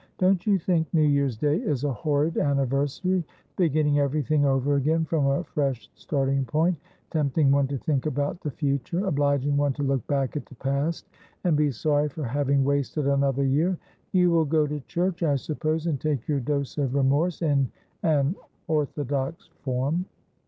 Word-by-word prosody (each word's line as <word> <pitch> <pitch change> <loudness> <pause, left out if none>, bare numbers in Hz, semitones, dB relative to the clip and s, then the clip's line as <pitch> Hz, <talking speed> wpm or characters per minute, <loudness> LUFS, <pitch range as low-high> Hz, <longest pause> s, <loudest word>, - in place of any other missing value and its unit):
' - - -41
Don't 185 +1 +2
you 200 -2 +4
think 165 -2 0
New 155 - +4
Year's 140 -5 +2
Day 145 +5 +1
is 140 -3 -2
a 145 -2 0
horrid 150 +6 0
anniversary? 140 +6 0 0.2
— - - -39
beginning 155 -4 +2
everything 145 +1 +1
over 135 +1 +2
again 160 +4 +1
from 155 -3 +1
a 140 0 +1
fresh 135 -8 -2
starting 135 -2 -1
point: 160 +6 +1 0.4
tempting 145 -2 +2
one 140 -1 +3
to 140 0 -3
think 140 +1 -1
about 145 +3 -2
the 150 - -3
future; 145 +6 -1
obliging 145 -3 +1
one 145 -1 +2
to 145 - -4
look 135 -4 -1
back 135 -1 0
at 150 - -4
the 130 - -14
past 140 +6 -2 0.4
and 175 -4 +3
be 150 0 +3
sorry 145 +3 +1
for 150 +2 -6
having 140 +2 +1
wasted 140 +1 0
another 140 -1 +2
year. 160 +7 +2 0.3
You 180 -2 +4
will 165 -1 +3
go 155 +1 +2
to 150 0 -3
church, 180 0 -1
I 150 -4 +2
suppose, 155 +3 -2
and 150 -6 -1
take 145 -6 -1
your 145 -2 +1
dose 140 +2 -2
of 135 -2 0
remorse 145 +6 +1
in 140 -5 +2 0.3
an 155 -1 +2 0.3
orthodox 145 -1 -2
form 140 +7 -1
145 Hz, 180 wpm, -26 LUFS, 140-155 Hz, 0.4 s, you